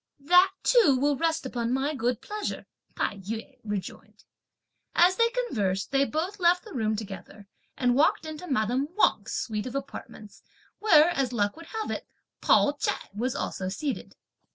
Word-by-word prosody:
"That 360 +6 +5
too 415 - +5
will 285 +1 +2
rest 325 0 0
upon 240 -2 -2
my 275 +3 0
good 245 -3 -1
pleasure," 420 0 -5 0.3
Tai 205 - -1
yü 220 +4 -7
rejoined. 205 -3 -6 0.7
As 360 +2 +5
they 465 +2 +3
conversed, 210 - -1
they 275 0 +3
both 350 +8 -3
left 360 +2 +3
the 430 - -10
room 220 -4 0
together 200 -1 -8 0.3
and 245 -1 +2
walked 290 +4 +3
into 315 +3 -7
madame 250 +2 +1
Wang's - - +2
suite 215 +1 -3
of 250 - -7
apartments, 220 -6 -8 0.4
where, 340 -6 +6
as 270 -6 0
luck 205 -3 0
would 330 0 -12
have 445 -1 -4
it, - - -5 0.3
Pao 285 - +4
ch'ai - - -2
was 240 +5 -2
also 185 -1 -3
seated. 270 +8 -4
270 Hz, 160 wpm, -27 LUFS, 220-340 Hz, 0.7 s, where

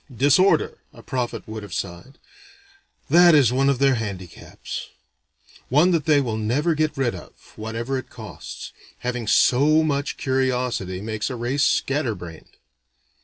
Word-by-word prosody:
"Disorder," 145 - +3
a - - -15
prophet 125 -3 -4
would 110 0 -6
have 100 -4 -8
sighed: 90 +9 -6 0.9
"that 175 0 +7
is 130 -5 +4
one 135 +2 +2
of 140 - +2
their 135 0 +3
handicaps; 100 -7 -6 0.8
one 150 +8 +4
that 165 -4 +1
they 150 -2 +4
will 120 -5 -2
never 130 +10 0
get 155 -1 -1
rid 130 -3 0
of, 90 - -10 0.2
whatever 115 +5 -3
it - - -11
costs. 110 -6 -9 0.3
Having 125 -2 -3
so 150 +8 +4
much 145 -2 -1
curiosity 125 -8 -1
makes 110 0 -3
a 130 - -4
race 125 +5 -1
scatter 135 -5 +1
brained. 85 -3 -12
130 Hz, 145 wpm, -23 LUFS, 110-145 Hz, 0.9 s, that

